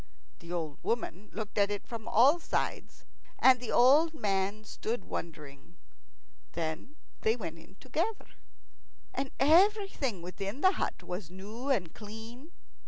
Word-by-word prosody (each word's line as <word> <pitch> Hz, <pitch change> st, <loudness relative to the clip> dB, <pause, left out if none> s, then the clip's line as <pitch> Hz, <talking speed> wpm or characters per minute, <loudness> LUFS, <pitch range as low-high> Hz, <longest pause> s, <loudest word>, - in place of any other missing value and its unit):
The 170 Hz, 0 st, -10 dB
old 160 Hz, -5 st, -3 dB
woman 215 Hz, -3 st, -2 dB
looked 215 Hz, -1 st, -4 dB
at 200 Hz, 0 st, +4 dB
it 205 Hz, -1 st, -4 dB
from 230 Hz, -1 st, -7 dB
all 265 Hz, +9 st, +5 dB
sides. -, -, -3 dB, 0.3 s
And 260 Hz, -1 st, +6 dB
the 245 Hz, -, -5 dB
old 295 Hz, +6 st, +5 dB
man 200 Hz, -3 st, -1 dB
stood, 220 Hz, 0 st, -4 dB
wondering. 155 Hz, 0 st, -7 dB, 0.8 s
Then 165 Hz, -, -4 dB, 0.3 s
they 220 Hz, +1 st, +3 dB
went 165 Hz, -8 st, -6 dB
in 175 Hz, +4 st, -17 dB
together. 335 Hz, -, -2 dB, 0.9 s
And 270 Hz, 0 st, -2 dB
everything 320 Hz, -, +3 dB
within 195 Hz, -, -5 dB
the 375 Hz, -, +6 dB
hut -, -, -3 dB
was 180 Hz, -1 st, -5 dB
new 210 Hz, +8 st, -7 dB
and 180 Hz, -12 st, +1 dB
clean. 225 Hz, +7 st, -10 dB
215 Hz, 135 wpm, -31 LUFS, 180-265 Hz, 0.9 s, And